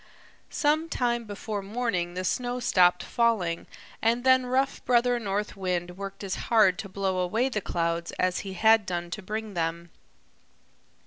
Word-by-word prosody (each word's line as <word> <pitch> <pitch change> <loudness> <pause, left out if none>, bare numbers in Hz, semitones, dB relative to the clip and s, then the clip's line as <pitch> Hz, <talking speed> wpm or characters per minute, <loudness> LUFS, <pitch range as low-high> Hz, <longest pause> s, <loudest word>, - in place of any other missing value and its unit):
Some 310 +2 +1
time 240 -4 0
before 205 0 -5
morning 195 -5 -2
the 185 - -3
snow 245 +6 -1
stopped 180 -7 +3
falling 215 -8 0 0.3
and 235 +2 +2
then 260 -1 +4
rough 265 +2 0
Brother 245 0 +3
North 205 -1 -2
Wind 180 -2 -2
worked 195 +1 -7
as 190 -1 -3 0.2
hard 215 -6 +4
to 195 - -6
blow 190 -1 -1
away 220 +9 +1
the 215 -5 -2
clouds 170 -1 -2
as 185 0 0
he 195 -1 -6
had 220 +2 +4
done 175 -1 -3
to 210 - -4
bring 215 +1 -5
them. 170 0 -3
200 Hz, 155 wpm, -27 LUFS, 180-235 Hz, 0.3 s, then